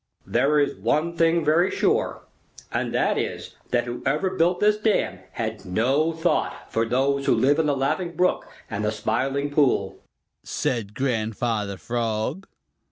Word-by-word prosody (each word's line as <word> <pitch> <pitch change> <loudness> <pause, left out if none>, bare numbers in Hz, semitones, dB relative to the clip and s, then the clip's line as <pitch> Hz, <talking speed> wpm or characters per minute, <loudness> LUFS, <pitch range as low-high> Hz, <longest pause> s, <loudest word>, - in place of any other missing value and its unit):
"There 150 +2 +2
is 145 - +1
one 155 - 0
thing 165 0 +2
very 165 +5 +4
sure, - - 0 0.5
and - - -1
that - - +1
is - - -4
that 120 -1 +2
whoever 135 +9 -1
built 175 -1 +2
this 210 0 +4
dam 215 -1 +1
had - - -4
no 130 - +1
thought 165 +2 -1
for 115 0 +1
those 140 +3 +1
who - - +5
live 145 +4 +3
in 160 - +2
the 145 -1 +1
Laughing 170 +6 -1
Brook 180 +3 +1 0.2
and 105 -1 -4
the 105 - +1
Smiling 135 +7 -1
Pool," 135 -10 +1 0.4
said 110 -4 -2
Grandfather 110 -4 -1
Frog. 120 - -2
140 Hz, 150 wpm, -24 LUFS, 115-165 Hz, 0.5 s, who